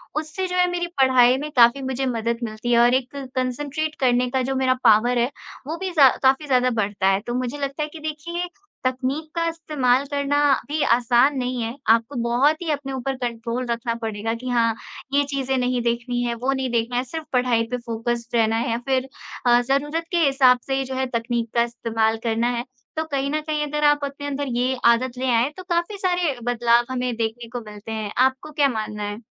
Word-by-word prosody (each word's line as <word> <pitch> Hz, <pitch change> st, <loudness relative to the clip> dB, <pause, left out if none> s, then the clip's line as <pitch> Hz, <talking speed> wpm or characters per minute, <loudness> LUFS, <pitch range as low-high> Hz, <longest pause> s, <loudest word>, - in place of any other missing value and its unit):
उससे 310 Hz, +4 st, -3 dB
जो 360 Hz, -, -4 dB
है 360 Hz, 0 st, +4 dB
मेरी 350 Hz, 0 st, -2 dB
पढ़ाई 255 Hz, -1 st, +5 dB
में 295 Hz, +3 st, -4 dB
काफ़ी 240 Hz, +2 st, +5 dB
मुझे 265 Hz, 0 st, -2 dB
मदद 235 Hz, -2 st, -1 dB
मिलती 220 Hz, +1 st, -3 dB
है, 235 Hz, -, +5 dB
और 240 Hz, +1 st, +5 dB
एक 260 Hz, +1 st, -1 dB, 0.2 s
कॉन्संट्रेट 290 Hz, +4 st, -2 dB
करने 250 Hz, -1 st, +2 dB
का 260 Hz, +1 st, 0 dB
जो 265 Hz, +1 st, -2 dB
मेरा 260 Hz, -1 st, +2 dB
पावर 240 Hz, +4 st, +5 dB
है, 240 Hz, +1 st, +2 dB, 0.4 s
वो 320 Hz, +2 st, -3 dB
भी 375 Hz, +1 st, -4 dB
ज़ा 275 Hz, -3 st, +9 dB
काफ़ी 265 Hz, +3 st, +3 dB
ज़्यादा 255 Hz, -2 st, +3 dB
बढ़ता 205 Hz, -4 st, 0 dB
है। 195 Hz, 0 st, +3 dB
तो 240 Hz, -, -2 dB
मुझे 250 Hz, +2 st, -2 dB
लगता 280 Hz, +1 st, -3 dB
है 300 Hz, -, -4 dB
कि 325 Hz, -, -8 dB
देखिए, 310 Hz, +3 st, -4 dB, 0.4 s
तकनीक 260 Hz, +4 st, -1 dB
का 335 Hz, 0 st, 0 dB
इस्तेमाल 285 Hz, -6 st, +1 dB
करना 285 Hz, 0 st, +1 dB, 0.3 s
भी 300 Hz, +1 st, -2 dB
आसान 245 Hz, +4 st, +3 dB
नहीं 250 Hz, -1 st, -2 dB
है। 230 Hz, +2 st, -3 dB
आपको 230 Hz, +5 st, +3 dB
बहुत 270 Hz, +7 st, +2 dB
ही 335 Hz, -3 st, -1 dB
अपने 275 Hz, -2 st, -3 dB
ऊपर 265 Hz, +1 st, -3 dB
कंट्रोल 240 Hz, 0 st, -3 dB
रखना 235 Hz, 0 st, -1 dB
पड़ेगा 220 Hz, 0 st, -2 dB
कि 250 Hz, +2 st, -6 dB
हाँ, 230 Hz, -2 st, +2 dB, 0.4 s
ये 285 Hz, +1 st, +4 dB
चीज़ें 270 Hz, -1 st, -1 dB
नहीं 250 Hz, -1 st, 0 dB
देखनी 235 Hz, +1 st, -1 dB
है, 240 Hz, -1 st, -1 dB
वो 250 Hz, +3 st, -1 dB
नहीं 265 Hz, -1 st, -2 dB
देखना 235 Hz, +1 st, 0 dB
है, 250 Hz, -, +1 dB
सिर्फ़ 315 Hz, +5 st, -7 dB
पढ़ाई 250 Hz, -2 st, +2 dB
पे 250 Hz, -, 0 dB
फोकस्ड 235 Hz, +1 st, -3 dB
रहना 225 Hz, -1 st, +3 dB
है 235 Hz, +2 st, -1 dB
या 230 Hz, -, 0 dB
फिर 265 Hz, 0 st, 0 dB, 0.4 s
अ, 240 Hz, 0 st, +6 dB
ज़रूरत 285 Hz, +6 st, 0 dB
के 350 Hz, -, +1 dB
हिसाब 265 Hz, -2 st, +5 dB
से 270 Hz, -, 0 dB
ही 270 Hz, -, 0 dB
जो 260 Hz, 0 st, -5 dB
है 265 Hz, 0 st, 0 dB
तकनीक 235 Hz, 0 st, -1 dB
का 235 Hz, -, +4 dB
इस्तेमाल 225 Hz, -1 st, -1 dB
करना 230 Hz, 0 st, +1 dB
है। 240 Hz, -, -3 dB, 0.3 s
तो 315 Hz, -, +1 dB
कहीं 275 Hz, 0 st, 0 dB
न 305 Hz, -, 0 dB
कहीं 305 Hz, -1 st, -2 dB
अगर 300 Hz, +1 st, -2 dB
आप 295 Hz, 0 st, +5 dB
अपने 280 Hz, +1 st, -7 dB
अंदर 285 Hz, 0 st, -3 dB
ये 255 Hz, +2 st, +1 dB
आदत 240 Hz, +2 st, +3 dB
ले 260 Hz, +1 st, -1 dB
आएँ, 235 Hz, +3 st, +3 dB
तो 370 Hz, -, -7 dB
काफ़ी 345 Hz, +4 st, 0 dB
सारे 355 Hz, -6 st, 0 dB
बदलाव 240 Hz, 0 st, +3 dB
हमें 250 Hz, -1 st, -2 dB
देखने 230 Hz, +1 st, -3 dB
को -, -, -5 dB
मिलते 210 Hz, +1 st, -9 dB
हैं। 215 Hz, -2 st, -4 dB, 0.2 s
आपको 265 Hz, +3 st, -7 dB
क्या 290 Hz, -1 st, +3 dB
मानना 215 Hz, -3 st, -4 dB
है? 205 Hz, 0 st, -4 dB
255 Hz, 215 wpm, -23 LUFS, 235-285 Hz, 0.4 s, ज़ा